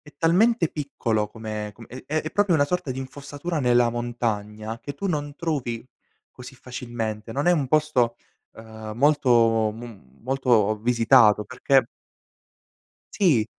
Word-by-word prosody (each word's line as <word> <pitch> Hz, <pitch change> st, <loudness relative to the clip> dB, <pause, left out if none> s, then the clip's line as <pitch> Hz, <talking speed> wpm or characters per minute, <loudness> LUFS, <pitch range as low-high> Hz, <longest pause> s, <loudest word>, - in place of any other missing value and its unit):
è 150 Hz, -, -17 dB
talmente 180 Hz, +3 st, +3 dB
piccolo, 115 Hz, -7 st, -2 dB
come 110 Hz, -2 st, -6 dB
com 115 Hz, -, -13 dB
è 130 Hz, +1 st, -10 dB
è 155 Hz, +1 st, -2 dB
proprio 200 Hz, -3 st, +2 dB
una 145 Hz, -2 st, +4 dB
sorta 165 Hz, -4 st, -2 dB
di 130 Hz, -, -4 dB
infossatura 145 Hz, +4 st, -5 dB
nella 120 Hz, -1 st, +3 dB
montagna, 115 Hz, -2 st, -3 dB
che 145 Hz, -, -7 dB
tu 195 Hz, -, -4 dB
non 145 Hz, -4 st, -2 dB
trovi 130 Hz, -8 st, -3 dB, 0.4 s
così 125 Hz, +1 st, -12 dB
facilmente. 120 Hz, -4 st, -6 dB
Non 140 Hz, +6 st, -2 dB
è 175 Hz, -, +6 dB
un 145 Hz, -6 st, 0 dB
posto, 130 Hz, -6 st, +2 dB, 0.4 s
ehm, 110 Hz, -1 st, -9 dB
molto 120 Hz, -6 st, +3 dB
m 110 Hz, -, -12 dB
molto 120 Hz, -5 st, +2 dB
visitato 115 Hz, -2 st, +4 dB
perché 130 Hz, +3 st, +2 dB, 1.4 s
Sì, 135 Hz, -, +4 dB
125 Hz, 135 wpm, -24 LUFS, 110-145 Hz, 1.4 s, è